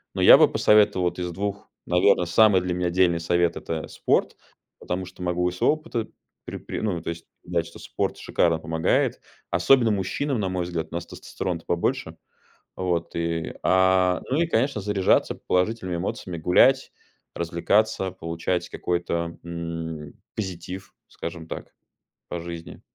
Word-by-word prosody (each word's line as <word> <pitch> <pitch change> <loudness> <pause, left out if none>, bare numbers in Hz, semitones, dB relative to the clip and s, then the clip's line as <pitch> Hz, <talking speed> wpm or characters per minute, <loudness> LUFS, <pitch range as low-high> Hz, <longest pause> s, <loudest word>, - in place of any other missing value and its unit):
Но - - -1
я - - +10
бы - - +6
посоветовал 105 -4 +4
вот 85 +1 -3
из 90 - -2
2, 100 +3 -4 0.2
наверно, 90 0 +3
самый 95 +2 +5
для 90 -1 -2
меня 90 0 0
дельный 85 -2 +3
совет- 85 +1 +1
это 80 -1 -4
спорт. - - 0 0.4
Потому 90 +1 -3
что 90 0 -10
могу 90 0 +1
из 90 - -8
своего - - +4
опыта 155 -8 -4 0.4
пре - - -6
пре - - -5
ну, 90 -6 -1
то 85 - -5
есть 85 0 -6 0.2
дать, 85 -1 -1
что - - -13
спорт - - -2
шикарно 85 -2 +1
помогает, 80 0 0 0.3
особенно 115 +8 +4
мужчинам, 115 +7 -1
на 95 -3 -1
мой 90 -1 -2
взгляд, 85 -2 -3
у - - -6
нас 85 0 -3
тестостерона-то 85 -3 -5
побольше. 85 0 -1 0.6
Вот 90 -2 -2
и, 85 -1 -2
а, 95 -1 +3
ну 135 - +2
и, 170 - +1
конечно, 130 -5 +1
заряжаться 100 -2 +2
положительными 90 -1 -1
эмоциями, 90 0 -4
гулять, 130 +11 +4 0.4
развлекаться, 95 +4 +1
получать 85 +1 -3
какой-то, 85 -1 -2
м, 80 -3 -5 0.2
позитив, 95 -1 -6
скажем 85 -1 -7
так, - - -8 0.5
по 85 - -4
жизни. 85 -1 -8
90 Hz, 155 wpm, -25 LUFS, 85-95 Hz, 0.6 s, я